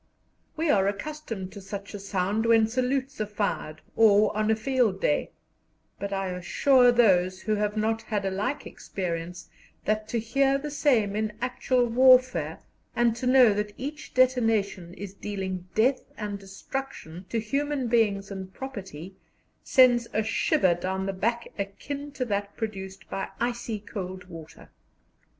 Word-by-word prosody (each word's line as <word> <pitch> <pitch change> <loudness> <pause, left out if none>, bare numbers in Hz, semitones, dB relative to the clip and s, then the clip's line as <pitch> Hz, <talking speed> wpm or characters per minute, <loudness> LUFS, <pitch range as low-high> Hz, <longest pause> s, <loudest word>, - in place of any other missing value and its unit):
We 320 -1 +2
are 195 -1 +3
accustomed 210 -3 -4
to 200 - -9
such 200 +1 -7
a 205 - -5
sound 200 +3 -1
when 225 -1 +5
salutes 255 +2 -1
are 215 - -1
fired 200 -7 -3
or 210 -2 +5
on 215 0 +1
a 220 - +4
field 225 -4 +1
day, 150 - +1 0.7
but 200 0 -4
I 195 -1 -1
assure 245 +8 +4
those 185 -6 +3
who 215 - 0
have 210 +1 -1
not 220 +1 0
had 210 -3 -2
a 195 - 0
like 210 +10 -2
experience, 175 -1 -5 0.4
that 215 0 0
to 235 - -2
hear 270 +5 +2
the 295 +1 -5
same 235 -9 +2
in 215 0 -1
actual 250 0 +1
warfare, 250 - +4 0.3
and 240 -1 +3
to 250 - -2
know 250 -4 +6
that 210 0 -3
each 295 +4 -7
detonation 225 -8 +2
is 200 -1 -7
dealing 190 -3 -5
death 255 +4 +3 0.2
and 205 -1 -4
destruction 195 -3 -7
to 230 - 0
human 275 +4 -1
beings 210 -4 +1
and 190 -1 -6
property, 190 - -7 0.5
sends 245 -2 +5
a 215 - +1
shiver 190 -4 +2
down 190 +2 -3
the 195 - -2
back 235 +5 -1
akin 280 +9 -5
to 255 - -2
that 205 -2 -3
produced 195 -4 -6
by 195 - -4
icy 235 -2 -2
cold 190 -3 -6
water. 165 -3 -12
215 Hz, 155 wpm, -27 LUFS, 195-245 Hz, 0.7 s, know